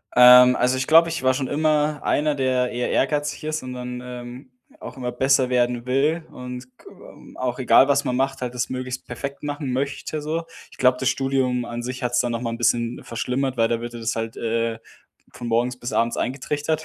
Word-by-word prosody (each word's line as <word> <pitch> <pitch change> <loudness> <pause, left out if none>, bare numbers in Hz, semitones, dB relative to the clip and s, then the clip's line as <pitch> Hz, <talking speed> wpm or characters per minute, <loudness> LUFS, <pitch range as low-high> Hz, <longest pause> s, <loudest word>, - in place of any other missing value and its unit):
Ähm, 125 0 +9
also 125 +1 +2
ich 130 - -2
glaube, 165 +1 +7
ich 165 -5 -4
war 130 0 +4
schon 130 0 -2
immer 150 0 +1
einer, 150 0 +1
der 130 -2 0
eher 120 0 -2
ehrgeizig 145 +2 0
ist 155 -2 -3
und 125 0 -6
dann, 125 0 -6
ähm, 125 +1 -9 0.3
auch - - -9
immer 125 -1 -3
besser 130 0 +2
werden 120 -1 0
will 150 +6 +1
und 125 0 -7 0.2
g - - -23 0.5
auch 125 0 -3
egal 130 +1 +5
was 140 0 +2
man 125 - -1
macht, 135 0 -1
halt 125 0 -4
das 125 - -2
möglichst 130 0 -5
perfekt 140 +4 -6
machen 145 -3 -3
möchte 140 +3 -3
so. 160 +3 -2 0.3
Ich - - -16
glaube, 125 0 +3
das 130 - +1
Studium 130 -2 0
an 120 0 -5
sich 130 +1 -5
hat's 125 0 +1
dann 120 -1 0
noch 115 0 -3
mal 115 - -2
'n 115 - -5
bisschen 120 0 0
verschlimmert, 130 +2 -2
weil 115 0 +3
da 115 0 -1
wird 120 0 -6
dir 120 - -7
das 115 0 -2
halt, 115 0 -4
äh, 115 0 -1 0.5
von 120 - -7
morgens 120 +2 0
bis 120 +2 -6
abends 115 0 +1
eingetrichtert 150 +4 -2
125 Hz, 215 wpm, -23 LUFS, 120-140 Hz, 0.5 s, Ähm